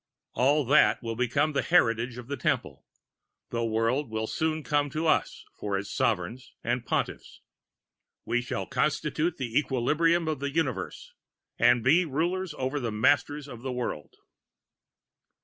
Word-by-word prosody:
All 140 +4 +3
that 145 0 +4
will 115 -1 -3
become 135 +6 +1
the 140 - +1
heritage 120 -8 +2
of 125 - -8
the 140 - -3
Temple: 125 - -2 0.6
the 115 0 -1
World 115 +5 0
will 110 0 -2
soon 155 +5 -1
come 145 0 +1
to 155 +4 -3
us 155 - +1
for 100 -1 -1
its 100 +1 -5
Sovereigns 115 +5 -1
and 120 +1 -1
Pontiffs. - - -3 0.8
We 120 - +1
shall 130 +2 -4
constitute 155 +3 0
the 120 -3 -5
equilibrium 155 +5 +2
of 155 -3 -1
the 140 +1 -2
Universe, 135 - -3 0.5
and 120 -2 +4
be 155 +9 +5
rulers 175 +4 -2
over 130 +3 -1
the 120 -4 -2
Masters 145 +6 +1
of 120 -4 -9
the 130 +1 -4
World. 120 - -4
130 Hz, 150 wpm, -28 LUFS, 115-150 Hz, 0.8 s, be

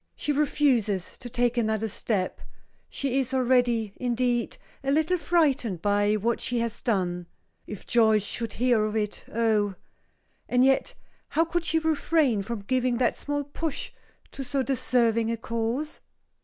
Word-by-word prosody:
She 300 - -2
refuses 260 -10 +1
to 245 - -7
take 245 +1 0
another 220 -1 0
step; 195 -2 -2 0.5
she 270 -1 -1
is 265 0 -1
already, 245 -4 +2
indeed, 245 -1 -1 0.3
a 270 - -2
little 315 +5 +2
frightened 290 - +1
by 205 0 +2
what 225 +3 0
she 245 - 0
has 230 -1 -2
done 180 -6 -1 0.4
If 210 - -7
Joyce 220 -3 +3
should 230 +1 -2
hear 240 -2 +2
of 215 0 -3
it 210 -1 -2
oh 215 -3 +1 0.7
And 250 +1 +4
yet 270 0 +2 0.3
how 325 - +2
could 345 +1 -1
she 325 0 +2
refrain 315 -7 +2
from 220 +1 -5
giving 255 +2 0
that 250 - +1
small 290 0 -3
push 290 +2 -4 0.4
to 275 - -6
so 270 +1 -1
deserving 235 -3 +1
a 230 - -1
cause? 230 +5 -3
240 Hz, 150 wpm, -26 LUFS, 220-270 Hz, 0.7 s, And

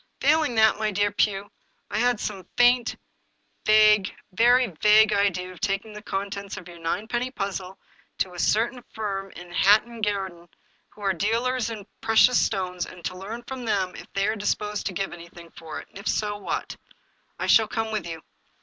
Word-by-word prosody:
Failing 295 -3 +3
that, 220 -1 +4
my 215 -1 +1
dear 205 0 +1
Pugh, 205 -1 0 0.4
I - - 0
had 245 -1 +2
some 195 -4 -5
faint, 245 -1 +4 0.7
vague, 215 -2 +6 0.2
very 245 +6 +5 0.2
vague 215 0 +6
idea 185 -3 +1
of 185 - -13
taking 205 +1 -1
the 210 - -8
contents 200 -1 -4
of 175 - -9
your 170 -1 -11
ninepenny 220 +9 -2
puzzle 195 -5 -5 0.4
to 185 - -1
a 175 - -8
certain 235 +7 +1
firm 195 -3 -3
in 175 0 -10
Hatton 215 +5 +3
Gar 200 -2 0
den, 175 0 -17 0.4
who 210 - -18
are 195 -1 +1
dealers 230 +6 0
in 215 -3 -7 0.2
precious 225 +3 +5
stones, 180 -3 -1
and 175 -2 -12
to 185 - -3
learn 215 +6 -7
from 260 +1 -7
them 195 -4 0
if - - -11
they 195 0 +1
are 220 - 0
disposed 210 0 -2
to 195 - -3
give 195 +1 -3
anything 170 0 -12
for 160 -2 -8
it, - - -12
and - - -11
if 200 - -7
so> 210 -1 0
what." 205 - -4 0.3
" - - -41
I - - -1
shall 220 -1 +5
come 225 0 -2
with 215 -4 -2
you." 165 -1 -7
205 Hz, 190 wpm, -25 LUFS, 190-220 Hz, 0.7 s, vague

